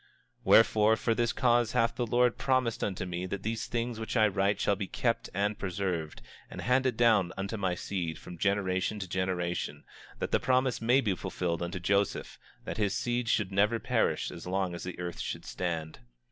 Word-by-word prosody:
25:21 - - -31 0.4
Wherefore, 110 +1 +6
for 115 +1 0
this 120 +1 +1
cause 120 -3 +2
hath 115 0 +2
the 120 -1 -1
Lord 125 +1 +4
God - - -31
promised 130 -4 +1
unto 95 -2 -2
me 90 +1 -4
that 95 +1 -5
these 110 +1 -2
things 120 -1 -2
which 110 +2 -3
I 110 -1 +6
write 100 0 +1
shall 100 - +2
be 100 0 -4
kept 115 +3 -1
and 100 +2 -1
preserved, 90 -4 -3 0.3
and - - -8
handed 125 -1 +2
down 110 -7 +4
unto 100 +3 -3
my 95 -4 -1
seed, 85 -4 -3
from 85 +1 -10
generation 100 0 0
to 95 -2 -5
generation, 90 -1 -2 0.3
that - - -3
the - - +3
promise 130 -1 +1
may 125 +4 +4
be 105 -6 +1
fulfilled 90 -2 -3
unto 85 +1 -3
Joseph, 100 +3 0 0.3
that - - -4
his 105 -3 +1
seed 120 -1 -1
should 105 -4 +1
never 105 +4 +3
perish - - 0
as 85 - -9
long 95 -1 -1
as 85 - -6
the 90 - -6
earth 90 -1 -5
should - - -4
stand. 80 -3 -4
100 Hz, 200 wpm, -30 LUFS, 90-115 Hz, 0.4 s, Wherefore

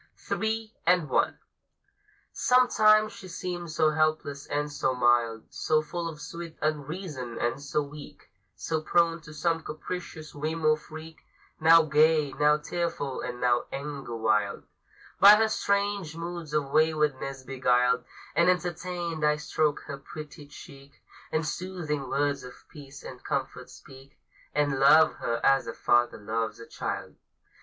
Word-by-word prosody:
THREE 220 0 -3
AND 175 -4 +3
ONE. - - +2 1.0
Sometimes 215 -4 +4
she 190 - -11
seems 175 -2 -5
so 155 -1 +3
helpless 155 -2 -1
and 150 0 -2
so 130 -2 -1
mild, 120 -2 +2
So 155 -1 +1
full 170 +2 -4
of 155 -2 -10
sweet 170 +1 -8
unreason 150 -4 -4
and 120 +3 -1
so 145 +1 -1
weak, 145 +1 -12 0.2
So 160 -1 -2
prone 165 +1 +2
to 150 -1 -12
some 165 +2 -1
capricious 155 0 -7
whim 155 +2 -3
or 155 0 +5
freak; 155 +1 -11 0.4
Now 165 +1 +7
gay, 155 -1 +3
now 150 +2 +3
tearful, 150 -4 -3
and 125 0 -5
now 120 -1 +2
anger 140 -3 -5
wild, 105 -2 0 0.6
By 200 +2 +10
her 220 +1 +3
strange 200 -6 -1
moods 170 -2 -6
of 140 -2 0
waywardness 150 -4 +1
beguiled 125 -1 +2 0.3
And 170 +1 +4
entertained, 175 -2 -2
I 150 0 +4
stroke 150 0 -1
her 140 - -7
pretty 150 0 -10
cheek, 140 -1 -14 0.3
And 155 0 0
soothing 155 -6 -4
words 140 0 0
of 125 - -13
peace 145 -2 -12
and 125 -1 -10
comfort - - -3
speak; 135 +1 -15 0.4
And 145 -2 +1
love 155 +3 +6
her 115 0 -2
as 135 0 +4
a - - -4
father 120 0 +2
loves 110 +2 -3
a 115 - -9
child. - - -5
150 Hz, 145 wpm, -27 LUFS, 135-170 Hz, 1.0 s, By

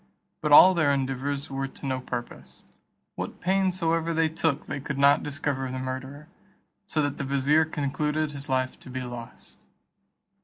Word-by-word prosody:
But 150 - -1
all 185 +6 +10
their 155 -5 +2
endeavours 140 +1 -2
were 135 0 -2
to 135 - -11
no 130 -1 -1
purpose; 120 -1 -7 0.5
what - - -6
pains 190 0 +1
soever 165 -1 0
they 160 0 +2
took 155 -2 -1
they - - -4
could 140 0 -5
not 140 +1 +5
discover 140 -3 -3
the 130 - -4
murderer; 130 +3 -6 0.6
so 155 -4 0
that 145 -1 -2
the - - -3
vizier 140 +3 +3
concluded 150 +1 -1
his 140 0 -9
life 130 -1 -1
to - - -12
be 130 0 -4
lost. 120 -2 -10
140 Hz, 165 wpm, -26 LUFS, 130-155 Hz, 0.6 s, all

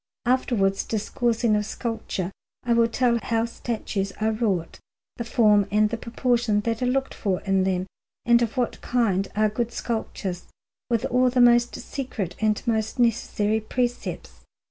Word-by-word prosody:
Afterwards, 235 -6 +1
discoursing 225 +1 0
of 210 - +1
sculpture, 210 -4 -4 0.3
I 240 - +2
will 230 0 +4
tell 235 0 +1
how 230 0 0
statues 220 -4 -3
are 220 +1 0
wrought, 205 -7 -1 0.4
the 235 - -3
form 210 -3 +3
and 210 +1 +2
the 230 - -1
proportion 235 -2 0
that 225 +2 -2
are 250 - +1
looked 270 +1 0
for 190 -4 -1
in 195 -1 +1
them, 185 -1 0 0.4
and 235 0 +5
of 235 +2 -1
what 245 -2 -1
kind 200 -6 +1
are 215 +1 +3
good 235 +2 -2
sculptures, 210 -6 -4 0.4
with 235 +1 +1
all 250 0 +3
the 250 +1 0
most 240 0 +5
secret 220 -10 -5
and 215 -1 +1
most 220 +1 -1
necessary 220 -2 +1
precepts. 245 +2 -3
225 Hz, 155 wpm, -25 LUFS, 210-240 Hz, 0.4 s, and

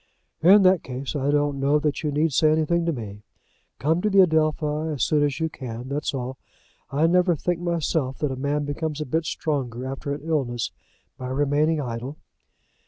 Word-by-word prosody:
"In 195 +4 +7
that 185 -2 +5
case 130 +3 -5
I 140 -1 0
don't 145 -1 +1
know 140 +2 +3
that 150 -1 -1
you 150 - -1
need 150 +1 +1
say 155 +3 +4
anything 165 +2 +1
to - - +3
me. 105 -7 -7 0.6
Come 160 +8 +1
to 210 - +1
the 195 -1 +6
Adelphi 155 -2 +1
as 140 -6 -1
soon 150 -1 +2
as 145 0 0
you 160 - +1
can; 125 -4 -7
that's 145 +2 -2
all. 130 -1 -5 0.5
I 145 +4 +2
never 180 +1 +3
think 175 +3 -2
myself 165 -6 -1
that 150 -3 -1
a - - -3
man 145 +2 -1
becomes 150 +1 -3
a 150 - -2
bit 160 +5 -1
stronger 130 -6 -2
after 135 +2 -4
an 145 - -4
illness 135 -8 -1 0.5
by 130 - -5
remaining 145 +4 +1
idle." 125 +2 -5
150 Hz, 190 wpm, -24 LUFS, 135-160 Hz, 0.6 s, In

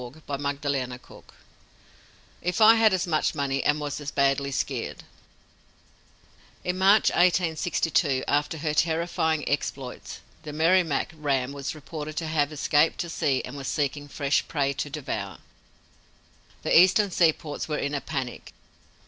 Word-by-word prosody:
_" 140 -1 -4 1.2
"IF 180 +3 -1
I 220 +1 +8
HAD 225 -1 +5
AS 185 -2 0
MUCH 160 -2 0
MONEY 140 -2 -1
AND 150 +1 +2
WAS 145 0 -4
AS 145 - -4
BADLY 140 -1 +1
SKEERED 135 - -3 0.8
" - - -31
In 180 - -1
March, 200 +3 +5
1862, 165 -5 +1
after 145 +2 0
her 155 0 -2
terrifying 160 -1 0
exploits, 135 -2 -4 0.2
the 150 -2 -8
Merrimac 165 -1 +2
ram 140 -4 -1
was 140 +1 -5
reported 155 0 -7
to 165 - -2
have 155 -2 0
escaped 150 +1 +2
to 170 - -5
sea 140 -5 0
and 125 - -8
was 135 -2 -6
seeking 145 0 -2
fresh 140 0 0
prey 140 -3 0
to 140 +2 -4
devour. 110 -10 -5 1.3
The - - +1
Eastern 190 +3 +5
seaports 160 -3 0
were 150 -1 -2
in 145 - -2
a 145 - -1
panic. 130 -5 -5
150 Hz, 140 wpm, -26 LUFS, 140-165 Hz, 1.3 s, I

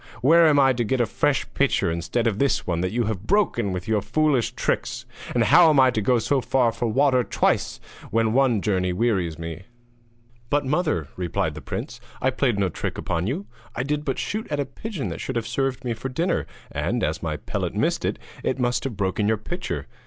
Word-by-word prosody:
Where 165 +4 +6
am 145 -2 +5
I 135 -1 +5
to 120 -1 -1
get 130 +4 0
a 120 - +3
fresh - - 0
pitcher - - +2
instead 85 +8 -1
of 110 -3 0
this 140 -1 +1
one 85 -1 -1
that 90 - -1
you 120 +2 0
have 105 -2 -4
broken 195 - +2
with 90 0 -4
your 110 -2 +2
foolish 150 -2 +1
tricks? - - -2 0.3
And - - +4
how 165 - +7
am 150 -3 +4
I 130 -1 +6
to 110 - -1
go 125 +4 +3
so 135 +4 +1
far 125 -2 +2
for 120 - -2
water 130 +2 +3
twice 100 - 0 0.3
when 110 0 +1
one 125 -6 +3
journey 90 -3 +1
wearies 90 -7 0
me?' 80 0 -6
[Illustration: 95 - -23
THE 120 0 -35
UNLUCKY 115 0 -35
SHOT] 120 0 -33
'But, 145 -1 +1 0.3
mother,' 75 -3 -6
replied 85 -3 -1
the 80 - -8
prince, - - -6 0.2
'I 130 - +2
played 125 -5 +1
no 100 -2 +1
trick - - -4
upon 85 +2 -2
you! 165 - -2 0.3
I 125 - -1
did 150 +2 -1
but 135 -3 -2
shoot 215 +2 -3
at 145 - -1
a 140 - 0
pigeon 210 -5 -5
that - - -6
should 130 - -4
have 115 -1 -1
served 130 +1 -2
me 120 - 0
for 125 +4 -5
dinner, 165 +8 -1 0.2
and - - -1
as - - -1
my - - -2
pellet - - -3
missed - - 0
it, - - -1 0.3
it - - 0
must 120 -1 0
have 120 -7 -4
broken 100 +1 0
your 110 0 +2
pitcher. 175 - -4
120 Hz, 230 wpm, -24 LUFS, 100-135 Hz, 0.3 s, how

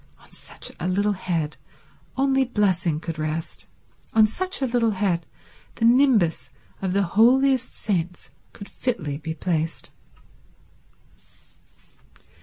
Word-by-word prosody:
On - - -22
such - - -6
a 175 - -2
little 200 +3 +1
head 170 -6 -2 0.6
only 270 0 +3
blessing 185 - +1
could 160 -1 -6
rest, 155 +1 -4 0.5
on 220 -1 +6
such 370 - -2
a 270 - +1
little 240 -2 +2
head 180 -4 0 0.5
the 230 - 0
nimbus 225 - +3 0.3
of 190 -2 -1
the 200 +1 +2
holiest 250 +7 +3
saints 180 -4 -3 0.2
could 200 - -10
fitly 150 - -3
be 160 0 -5
placed. 165 -2 -2
195 Hz, 115 wpm, -24 LUFS, 165-240 Hz, 0.6 s, on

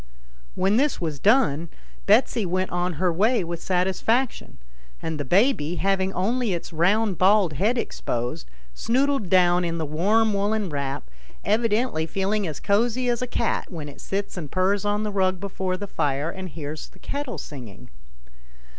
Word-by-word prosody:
When 195 +3 +2
this 290 +3 +1
was 155 -5 -3
done, 185 - +3 0.4
Betsy 225 +2 +4
went 185 +1 -1
on 175 0 -1
her 175 +2 0
way 215 +4 +2
with 170 0 -5
satisfaction, 190 +7 0 0.4
and 160 -2 -4
the - - -1
baby, 175 - +2
having 195 0 +1
only 225 +3 0
its 170 - -7
round 190 +4 +2
bald 190 -3 +4
head 215 - +1
exposed, 120 - -3 0.2
snoodled 260 - 0
down 180 -1 +4
in 170 -1 -2
the 160 - -2
warm 205 +9 +2
woollen 205 0 0
wrap, 140 - -3 0.4
evidently 215 -5 +1
feeling 195 +2 -1
as 155 -3 -5
cosy 235 +4 +1
as 240 0 0
a 250 - -1
cat 235 -3 -1
when 160 -4 -6
it 145 - -11
sits 195 0 -3
and 155 -5 -5
purrs 190 +4 +1
on 205 +1 0
the 210 - -2
rug 185 -2 +1
before 190 -1 -3
the 205 - -5
fire 145 -4 -1
and 190 0 -7
hears 150 0 -7
the - - -20
kettle 285 -3 -4
singing. 125 - -9
190 Hz, 165 wpm, -24 LUFS, 165-215 Hz, 0.4 s, Betsy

